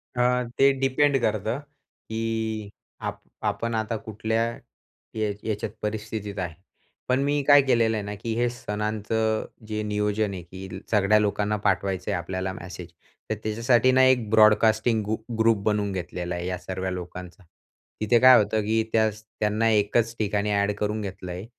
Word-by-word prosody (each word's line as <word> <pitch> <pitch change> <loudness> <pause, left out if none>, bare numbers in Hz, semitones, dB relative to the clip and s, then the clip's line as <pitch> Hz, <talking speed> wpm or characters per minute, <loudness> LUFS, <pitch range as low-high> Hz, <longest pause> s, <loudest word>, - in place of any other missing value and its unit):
अ, 125 - +1 0.4
ते 135 +1 +6
डिपेंड 135 +1 +3
करतं, 110 +3 0 0.5
की 110 -1 -2 0.3
आप - - -4 0.3
आपण 115 +3 -3
आता 110 +1 -1
कुठल्या 110 +1 -2 0.7
या 110 -1 0
याच्यात 110 0 -3
परिस्थितीत 105 -1 -4
आहे. 90 -3 -3 0.6
पण 130 +1 +3
मी 145 +1 +1
काय 145 -1 +8
केलेलं 115 -4 +2
आहे 105 - -3
ना, 105 0 -5
की 115 +2 -4
हे 120 +1 +1
सणांचं 110 0 -2 0.2
जे 110 0 -2
नियोजन 105 0 0
आहे, 90 - -6
की 95 +2 -9
सगळ्या 105 0 +4
लोकांना 105 0 0
पाठवायचं 95 -2 0
आहे - - 0
आपल्याला 95 +2 -3
मॅसेज, 90 -1 -9 0.4
तर 110 - 0
त्याच्यासाठी 115 +4 +3
ना 130 0 +5
एक 125 -4 +3
ब्रॉडकास्टिंग 110 +1 +4
गु 105 +2 -1 0.2
ग्रुप 115 -1 +4
बनवून 105 -1 +1
घेतलेला 90 -1 -4
आहे 85 0 -4
या 90 0 -2
सर्वा 95 +1 -4
लोकांचा. 90 0 -7 0.6
तिथे 110 +2 +4
काय 130 +1 +9
होतं, 110 +1 -1
की 110 +2 +1
त्याच 110 -1 +1
त्यांना 110 +1 0
एकच 110 +2 +2
ठिकाणी 105 0 0
ॲड 100 0 +2
करून 105 +1 -1
घेतलं 95 -2 -6
आहे. 90 +3 -6
105 Hz, 160 wpm, -25 LUFS, 100-115 Hz, 0.7 s, काय